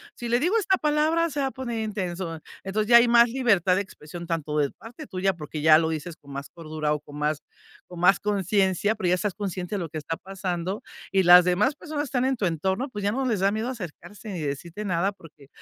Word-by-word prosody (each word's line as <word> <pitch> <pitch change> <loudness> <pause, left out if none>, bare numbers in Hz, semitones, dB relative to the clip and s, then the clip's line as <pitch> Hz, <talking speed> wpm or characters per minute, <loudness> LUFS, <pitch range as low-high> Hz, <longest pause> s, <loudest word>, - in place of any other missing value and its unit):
si 240 - -6
le 240 +1 +2
digo 360 - +2
esta 380 -3 +2
palabra 310 +2 +2
se 290 -1 -4
va 270 - +1
a - - -4
poner 240 -4 -4
intenso. 185 -5 -4 0.2
Entonces, 210 +3 -2
ya 235 - +9
hay 235 +1 +6
más 235 0 +6
libertad 220 -8 +2
de 200 - +1
expresión, 170 -1 -10
tanto 155 -3 -2
de 145 -2 +1
parte 225 +3 -11
tuya, 190 0 0
porque 150 -2 -7
ya 155 0 +7
lo 160 0 +1
dices 160 +1 -4
con 140 -1 -15
más 140 +1 -6
cordura 155 -2 -4
o 150 - -2
con 145 0 -12
más, 150 0 0 0.5
con 180 -1 -10
más 180 +2 +5
conciencia, 200 0 +1
pero, 185 -4 -1
ya 180 - +4
estás 190 +1 -2
consciente 185 -1 -4
de - - -1
lo 170 -3 -4
que 155 - -6
está 165 +3 -4
pasando 190 0 -4 0.3
y 195 - +4
las 175 0 +8
demás 205 +10 +2
personas 305 -2 -4
están 255 -1 0
en 265 0 +1
tu 210 - -2
entorno, 190 - -1
pues 205 - -4
ya, 205 - +1
no 265 +3 -1
les 220 -7 0
da 195 +1 +3
miedo 220 +3 -2
acercarse 205 -1 -8
ni 180 - -4
decirte 160 +8 -5
nada, 185 +2 +1
porque, 155 -7 -17
190 Hz, 240 wpm, -25 LUFS, 165-230 Hz, 0.5 s, ya